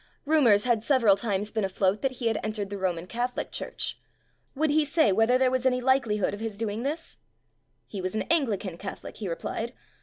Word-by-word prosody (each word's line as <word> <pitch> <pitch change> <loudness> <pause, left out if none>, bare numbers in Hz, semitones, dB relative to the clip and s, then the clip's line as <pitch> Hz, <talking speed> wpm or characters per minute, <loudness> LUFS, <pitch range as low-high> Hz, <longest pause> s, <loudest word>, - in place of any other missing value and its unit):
Rumors 255 -10 +5
had 235 -3 +2
sev 260 +1 +2
eral 200 -3 +7
times 205 0 -2
been 220 -2 -1
afloat 190 +1 +1
that 270 -1 0
he 245 -1 -6
had 225 -2 +1
en 215 - -3
tered 205 -2 -4
the 200 - -3
Roman 180 -3 -1
Catholic 245 +5 -3
church. - - -4 0.6
Would 305 +2 +1
he 310 +1 +4
say 295 - +3
whether 225 +5 +4
there 255 -1 +3
was 255 -1 0
any 255 -1 +2
likelihood 240 -7 +1
of 205 - -5
his 220 -2 -4
doing 220 0 -2
this? 300 +6 -4 0.7
He 200 - -6
was 185 +2 -3
an 220 - 0
Anglican 210 - 0
Catholic, 195 - -7
he 205 -4 -4
replied. 225 +7 -4
225 Hz, 210 wpm, -27 LUFS, 200-260 Hz, 0.7 s, eral